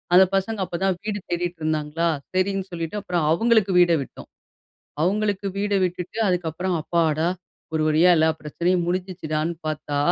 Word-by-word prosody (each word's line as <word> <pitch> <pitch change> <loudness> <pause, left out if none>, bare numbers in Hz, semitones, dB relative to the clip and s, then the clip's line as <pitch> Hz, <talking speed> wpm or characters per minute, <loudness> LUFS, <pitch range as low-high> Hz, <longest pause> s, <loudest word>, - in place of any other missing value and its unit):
அந்த 185 - +9
பசங்க 200 +3 -1
அப்ப 175 - -7
தான் 190 -2 +1
வீடு 210 -1 -2
தேடிட்டு 175 0 -2
இருந்தாங்களா, 155 +1 0 0.3
சரின்னு 190 +1 0
சொல்லிட்டு 165 +3 -4
அப்புறம் 180 -4 -1
அவங்களுக்கு 220 +2 +3
வீட 175 -1 +5
விட்டோம். 135 - -10 0.7
அவங்களுக்கு 200 +2 0
வீட 205 +1 -1
விட்டுட்டு, 180 +2 -4
அதுக்கப்புறம் 180 0 -1
அப்பாடா, 160 0 +1 0.5
ஒரு 155 - +1
வழியா 160 +4 +5
எல்லா 160 0 +4
பிரச்சனையும் 175 +4 0
முடுஞ்சுச்சுடானு 170 -3 -2
பார்த்தா, 150 -2 -2
175 Hz, 140 wpm, -23 LUFS, 160-190 Hz, 0.7 s, அந்த